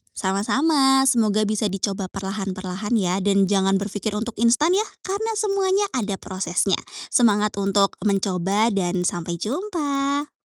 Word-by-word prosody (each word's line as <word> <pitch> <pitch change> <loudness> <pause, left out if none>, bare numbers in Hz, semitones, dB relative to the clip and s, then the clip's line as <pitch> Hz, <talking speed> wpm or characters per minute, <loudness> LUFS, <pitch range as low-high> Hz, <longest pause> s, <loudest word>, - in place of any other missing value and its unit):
Sama-sama. 270 +7 +2
Semoga 215 -4 +2
bisa 210 -2 -1
dicoba 195 -1 -3
perlahan 195 0 -4
perlahan 190 +4 -4
ya. 185 0 0
Jangan 195 -1 +2
berpikir 205 +1 -3
untuk 225 +2 -4
instan 295 +10 +3
ya. 425 - +2 0.2
Karena 415 +4 -2
semuanya 395 -1 +1
ada 205 -5 -1
prosesnya. 185 0 -1 0.3
Semangat 210 -4 +2
untuk 195 0 +1
mencoba 195 +1 +1
dan 180 -1 0
sampai 170 0 -3
jumpa. 285 - -2
210 Hz, 125 wpm, -22 LUFS, 195-270 Hz, 0.3 s, instan